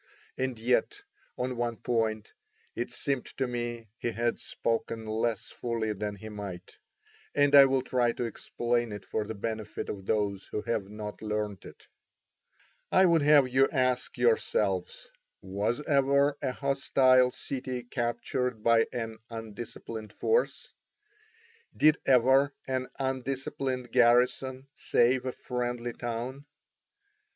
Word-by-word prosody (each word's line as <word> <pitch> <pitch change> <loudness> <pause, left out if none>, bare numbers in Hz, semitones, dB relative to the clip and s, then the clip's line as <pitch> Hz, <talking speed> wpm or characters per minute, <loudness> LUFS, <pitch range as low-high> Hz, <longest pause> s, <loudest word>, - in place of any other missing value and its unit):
And 130 -2 -2
yet, 125 - 0 0.3
on 125 0 -2
one 120 -1 -1
point, 110 -3 -1 0.4
it 120 - -3
seemed 135 -3 -2
to 135 - +1
me 120 -2 -4
he - - -1
had 120 0 -1
spoken 115 -1 -2
less 110 0 -2
fully 115 -2 -2
than 105 0 -4
he 100 +2 -10
might; 100 -4 -8 0.6
and 145 0 +4
I 140 -1 +10
will 135 -1 +1
try 120 -2 +2
to - - -3
explain 120 0 -1
it 100 -2 -8
for 105 +2 -2
the 110 - -5
benefit 110 0 -4
of 95 -1 -6
those 100 -3 0
who 105 - -4
have 110 -4 -2
not 105 0 -7
learnt 105 -2 -3
it. - - -13 1.0
I 190 - +6
would 170 -3 +4
have 145 -2 +6
you 130 +2 +3
ask 130 -1 0
yourselves, 485 +1 +1 0.3
was 105 +8 -2
ever 140 0 +3
a 130 - 0
hostile 130 -1 +3
city 130 -1 -4
captured 120 -1 -2
by 115 -1 +4
an 115 -2 -4
undisciplined 110 -1 -7
force? 465 +2 0 1.0
Did 155 0 +5
ever 135 +2 +4
an 130 -1 -1
undisciplined 130 -1 -2
garrison 125 +2 +3
save 125 +2 +2
a - - 0
friendly 120 -1 -3
town? 120 +4 -5
120 Hz, 130 wpm, -29 LUFS, 110-130 Hz, 1.0 s, I